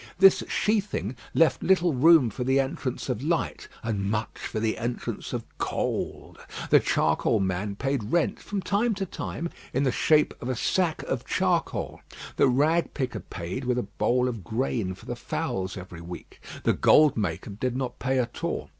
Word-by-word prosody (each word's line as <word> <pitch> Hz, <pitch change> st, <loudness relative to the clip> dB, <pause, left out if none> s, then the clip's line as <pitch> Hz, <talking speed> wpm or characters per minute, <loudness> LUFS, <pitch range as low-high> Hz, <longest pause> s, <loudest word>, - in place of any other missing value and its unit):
This 195 Hz, +1 st, +6 dB
sheathing 205 Hz, -, 0 dB, 0.2 s
left 165 Hz, -4 st, +4 dB
little 180 Hz, -3 st, +3 dB
room 140 Hz, -2 st, +6 dB
for 125 Hz, -, -4 dB
the 130 Hz, +2 st, +3 dB
entrance 135 Hz, -1 st, -2 dB
of -, -, -2 dB
light -, -, -1 dB, 0.2 s
and 100 Hz, -3 st, -1 dB
much 110 Hz, +1 st, -2 dB
for 110 Hz, -, -3 dB
the 110 Hz, 0 st, -1 dB
entrance 120 Hz, +1 st, -4 dB
of -, -, -3 dB, 0.2 s
cold. -, -, -3 dB, 0.3 s
The -, -, +8 dB
charcoal -, -, +2 dB
man 95 Hz, +1 st, -1 dB
paid 135 Hz, 0 st, -1 dB
rent 170 Hz, +10 st, +1 dB
from 200 Hz, -2 st, -4 dB
time 210 Hz, +5 st, +1 dB
to 195 Hz, 0 st, -2 dB
time 170 Hz, -1 st, -4 dB, 0.2 s
in 135 Hz, -, +1 dB
the 130 Hz, -, +2 dB
shape 150 Hz, +4 st, +3 dB
of 125 Hz, -, -4 dB
a 130 Hz, -, 0 dB
sack 170 Hz, +7 st, 0 dB
of -, -, -2 dB
charcoal; -, -, -1 dB, 0.4 s
the -, -, +5 dB
rag 150 Hz, +7 st, +2 dB
picker 130 Hz, -4 st, -2 dB
paid 90 Hz, +10 st, -6 dB
with 125 Hz, 0 st, +1 dB
a 125 Hz, -, 0 dB
bowl 115 Hz, +5 st, +1 dB
of 115 Hz, -6 st, -4 dB
grain 110 Hz, -1 st, -1 dB
for -, -, -16 dB
the -, -, -4 dB
fowls 95 Hz, 0 st, -3 dB
every 90 Hz, -2 st, -9 dB
week; 85 Hz, +1 st, -10 dB, 0.2 s
the -, -, +3 dB
"gold 150 Hz, -2 st, +5 dB
maker" 100 Hz, -3 st, -2 dB
did 125 Hz, +5 st, -2 dB
not 130 Hz, -2 st, -3 dB
pay 130 Hz, 0 st, 0 dB
at 125 Hz, -2 st, -2 dB
all. -, -, -2 dB
125 Hz, 180 wpm, -27 LUFS, 105-155 Hz, 0.4 s, The